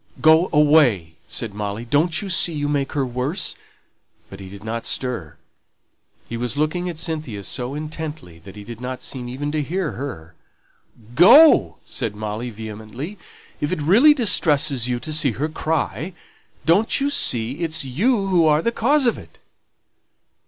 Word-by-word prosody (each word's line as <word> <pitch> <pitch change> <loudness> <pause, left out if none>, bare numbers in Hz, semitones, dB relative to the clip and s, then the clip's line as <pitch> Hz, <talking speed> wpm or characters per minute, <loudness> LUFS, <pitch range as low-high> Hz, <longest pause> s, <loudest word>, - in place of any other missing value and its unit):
"Go 160 +3 +5
away!" 145 - +3
said 110 -3 -3
Molly. 105 +2 -5
"Don't 155 - +1
you - - -5
see 170 -1 +2
you 145 -1 -2
make 145 -2 -1
her 140 -3 0
worse?" 130 +9 -2 0.8
But 95 - -10
he 95 -1 -9
did 100 +1 -12
not 115 +1 -4
stir; 120 - -3 0.9
he 115 - -5
was 125 +3 -3
looking 175 +4 -1
at 170 - -7
Cynthia 155 - -4
so 125 +6 -4
intently 155 - -7
that 95 +4 -13
he 105 - -9
did 115 +2 -10
not 125 0 -5
seem 125 -2 -5
even 145 +4 -4
to 155 0 -1
hear 175 +2 -2
her. 85 - -7 0.8
"Go," 240 - +7
said 115 -5 -4
Molly, 110 +3 -4
vehemently, 110 - -8 0.4
"if 145 +2 -2
it 185 - -1
really 225 - +5
distresses 150 - +2
you 125 -1 -1
to 155 +5 -6
see 145 -5 +1
her 145 +8 -2
cry. 160 +3 -2 0.5
Don't 195 - +3
you 280 +1 0
see, 120 - 0
it's 160 -4 0
you 200 - +1
who 175 -4 +3
are 155 +1 +3
the 235 - +1
cause 270 +5 +2
of 240 - +1
it?" - - -16
145 Hz, 165 wpm, -21 LUFS, 115-165 Hz, 0.9 s, Go